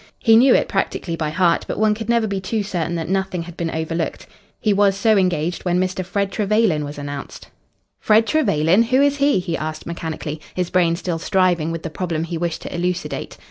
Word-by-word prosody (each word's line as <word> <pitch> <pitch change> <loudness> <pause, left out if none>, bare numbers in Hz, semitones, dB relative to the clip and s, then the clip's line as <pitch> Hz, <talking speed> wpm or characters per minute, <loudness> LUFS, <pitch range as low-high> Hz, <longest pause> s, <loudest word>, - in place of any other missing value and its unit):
He 225 -2 +4
knew 250 +3 +6
it - - +2
practically 190 -3 -2
by 155 -2 -2
heart, 170 +1 +2
but - - -4
one 215 +1 +3
could 220 +1 -6
never 235 -1 +3
be 200 -2 -2
too 210 +3 -2
certain 175 -4 -2
that 165 -1 -3
nothing 190 -2 -1
had 170 0 -10
been 170 -1 -2
overlooked. 160 +1 -3 0.3
He 215 - +2
was 200 -1 +3
so 220 +1 +3
engaged 175 -3 0
when 180 -1 +1
Mr. 185 0 -1
Fred 200 +2 -2
Trevelyan 210 -7 +1
was 145 0 -7
announced. 145 -1 -7 0.5
"Fred 220 +1 +4
Trevelyan? 200 - +3
Who 255 +3 +2
is 285 0 +3
he?" 280 -3 +3
he 175 -2 -2
asked 155 0 -5
mechanically, 160 -2 -5
his 180 -1 -2
brain 170 -2 +3
still 170 -1 -3
striving 175 -3 +1
with 165 -1 -5
the 165 - -5
problem 165 -1 -2
he 170 +1 -4
wished 170 0 -3
to - - -7
elucidate. 180 +2 -3
180 Hz, 210 wpm, -20 LUFS, 165-205 Hz, 0.5 s, knew